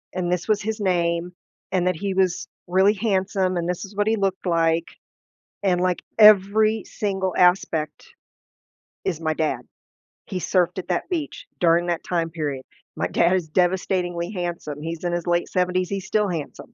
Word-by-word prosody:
and 180 -1 -1
this 180 +1 -1
was 215 -1 +2
his 220 +1 -3
name, 175 -2 0 0.4
and 180 -1 +2
that 185 - +1
he 195 +1 -2
was 185 -2 +1 0.2
really 190 +3 +4
handsome, 190 -3 0
and 170 0 -1
this 180 +2 -2
is 200 +1 -9
what 205 +1 +1
he 225 - +3
looked 195 -2 -1
like, 165 -1 +2 0.8
and, 180 -3 +2
like, 180 -1 0 0.2
every 215 +1 +6
single 190 -3 -2
aspect, 175 -4 +2 1.0
is 175 -4 -2
my 160 -1 0
dad. 155 0 -1 0.7
He 185 -2 -3
surfed 180 0 +1
at - - -7
that 180 - -2
beach 320 -5 -4
during 170 0 +3
that 170 -1 -2
time 165 -2 -1
period, 145 -5 -4 0.3
my - - -1
dad 175 +2 +2
is 165 -4 -2
devastatingly 180 0 0
handsome, 170 -6 -4
he's 165 +2 -5
in 175 - 0
his 175 0 -3
late 175 0 +1
70s, 180 0 0
he's 195 -1 -4
still 210 -2 +1
handsome. 170 +8 -6
180 Hz, 170 wpm, -23 LUFS, 170-195 Hz, 1.0 s, every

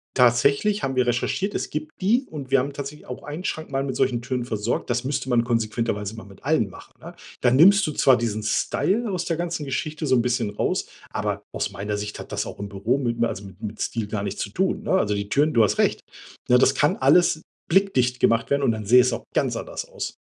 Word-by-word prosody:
tatsächlich 140 - +3
haben 135 -1 -1
wir 125 -1 +2
recherchiert, 155 - -1
es - - -3
gibt 155 +1 -4
die 235 +8 +2
und 140 -4 -8
wir 135 - +5
haben 140 +3 -2
tatsächlich 140 +1 -8
auch 125 - -7
einen 150 +5 -6
Schrank 155 -5 -4
mal 135 0 0
mit 135 -2 -3
solchen 120 -2 +1
Türen 125 -1 -3
versorgt. 110 +1 -2
Das 125 +1 0
müsste 135 0 -2
man 120 -1 +3
konsequenterweise 115 -2 -1
mal 110 - -9
mit 100 +2 -16
allen 135 -9 +1
machen, - - -14
ne? - - -10 0.3
Dann 125 0 +4
nimmst 195 +6 +7
du - - -1
zwar 135 -1 +5
diesen 110 -2 -2
Style 210 - 0
aus 180 - -2
der 165 -2 -1
ganzen 170 -3 -3
Geschichte 155 +3 -3
so 130 - +3
'n 120 - +4
bisschen 120 -3 0
raus, 105 - -1 0.2
aber - - -2
aus - - -2
meiner 105 +2 -3
Sicht 105 0 -5
hat - - -9
das - - -2
auch - - -8
im 100 0 -5
Büro 110 +7 0
mit 120 -3 -1
m 120 - +1
also 100 -3 -2
mit 95 +2 -13
mit 105 0 -5
Stil 115 -3 -2
gar 105 -1 -3
nichts 100 0 -4
zu 100 - -7
tun, 190 - -1
ne? - - -3
Also 105 - +2
die 100 0 -4
Türen 150 +3 +3
du 115 - +5
hast 105 - +1
recht, - - +2 0.5
ne? 125 0 +5
Das 135 +1 +4
kann 150 +10 +2
alles 170 -6 +4 0.3
blickdicht 135 -10 +2
gemacht 115 +2 +2
werden 140 0 +2
und 120 - +3
dann 110 -2 -4
sähe 125 +4 +7
es 125 +1 +1
auch - - -4
ganz - - +1
anders - - -5
aus. - - -5
125 Hz, 245 wpm, -24 LUFS, 110-155 Hz, 0.5 s, nimmst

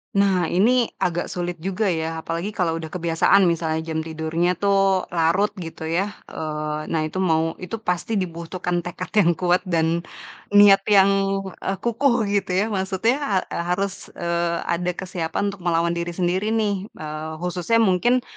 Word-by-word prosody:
Nah, 195 -4 +3
ini 230 +7 +3
agak 175 0 -1
sulit 175 -1 -4
juga 195 +3 -1
ya, 160 -1 -3
apalagi 170 +6 -4
kalau 165 -3 0
udah 160 - -6
kebiasaan 170 +3 +3
misalnya 160 -1 -1
jam 160 -1 -3
tidurnya 160 +2 -1
tuh, 195 0 +2
larut 170 +5 +2
gitu 165 -2 -7
ya, 170 +5 0 0.2
eee, 155 -1 -4
nah 160 - 0
itu 155 +4 -3
mau 165 -3 +2
itu 185 +4 -5
pasti 180 +5 -1
dibutuhkan 175 -1 -2
tekad 175 +1 -6
yang 175 -4 +5
kuat, 180 +2 +2
dan 165 -1 +1 0.6
niat 205 -1 +8
yang, 200 -2 +6 0.5
eee, 195 - -2
kukuh 240 +2 +2 0.2
gitu 200 -2 0
ya. - - -1
Maksudnya, 200 +3 0
ha - - -6 0.2
harus, 195 0 -4
eee, 170 0 -1
ada 180 +1 -1
kesiapan 180 +2 -2
untuk 200 - -12
melawan 170 0 +2
diri 170 0 -3
sendiri 185 +3 0
nih, 210 -3 0
eee, 155 0 -6
khususnya 180 +5 0
mungkin, 240 +6 +2
180 Hz, 155 wpm, -23 LUFS, 165-195 Hz, 0.6 s, niat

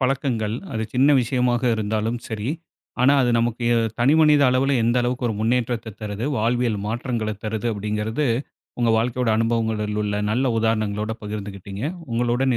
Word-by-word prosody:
பழக்கங்கள் 130 -5 0 0.2
அது 110 -1 -2
சின்ன 135 +3 +4
விஷயமாக 125 0 0
இருந்தாலும் 110 +2 -1
சரி. 110 +1 -3 0.5
ஆனா 135 +3 +6
அது 120 - +2
நமக்கு 120 +1 -1
எ - - +3 0.2
தனிமனித 150 +3 +5
அளவுல 135 +2 +2
எந்த 120 +2 +2
அளவுக்கு 125 +1 -1
ஒரு 110 - -2
முன்னேற்றத்த 115 -1 -1
தருது, 105 +3 -3
வாழ்வியல் 115 -1 +1
மாற்றங்கள 115 -1 -2
தருது 110 +1 -2
அப்படிங்கிறது, 105 +6 -2 0.5
உங்க 120 -1 +3
வாழ்க்கையோட 125 +1 0
அனுபவங்களில் 110 -2 0
உள்ள 105 0 -1
நல்ல 130 +5 +1
உதாரணங்களோட 110 -1 0
பகிர்ந்துகிட்டீங்க. 100 -1 -6 0.3
உங்களுடன் 120 +2 +1
115 Hz, 140 wpm, -23 LUFS, 110-125 Hz, 0.5 s, ஆனா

